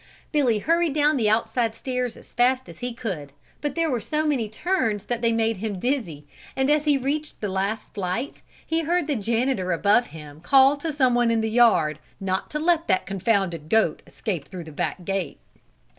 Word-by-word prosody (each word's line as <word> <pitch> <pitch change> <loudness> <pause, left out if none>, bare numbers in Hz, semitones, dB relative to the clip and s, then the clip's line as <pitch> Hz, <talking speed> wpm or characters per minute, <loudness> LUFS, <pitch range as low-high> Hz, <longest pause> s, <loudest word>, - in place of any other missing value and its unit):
Billy 265 -8 +2
hurried 330 +5 +1
down 300 0 +3
the 225 -5 +2
outside 225 +1 +1
stairs 250 -3 -3
as - - -16
fast 255 +2 +2
as - - -12
he 245 0 -3
could, 190 - -5 0.3
but 295 -2 -2
there 330 -1 +1
were 240 -3 -1
so 305 +8 -1
many 260 -8 0
turns 220 - -1
they 235 +1 0
made 225 -1 +1
him 205 0 -3
dizzy 185 - -2 0.3
and 265 +2 +2
as 300 0 +2
he 290 -2 +4
reached 290 +3 -3
the 210 - -2
last 195 +3 -2
flight, 200 +7 -3 0.2
he 325 +1 0
heard 340 +1 +1
the 295 -2 -1
janitor 225 -3 0
above 205 +8 +3
him 150 -2 -11
call 270 - +5
to 310 +3 -4
someone 250 -4 +3
in 230 -1 +2
the 220 0 -1
yard 215 -11 +4 0.2
not 190 -1 -2
to 300 - -3
let 330 +1 +1
that 185 -2 +2
confounded 195 -5 -1
goat 220 -8 +2
escape 185 - -4
through 180 -3 -7
the 160 - -10
back 175 +4 -3
gate. 195 -4 -2
230 Hz, 190 wpm, -24 LUFS, 195-275 Hz, 0.3 s, call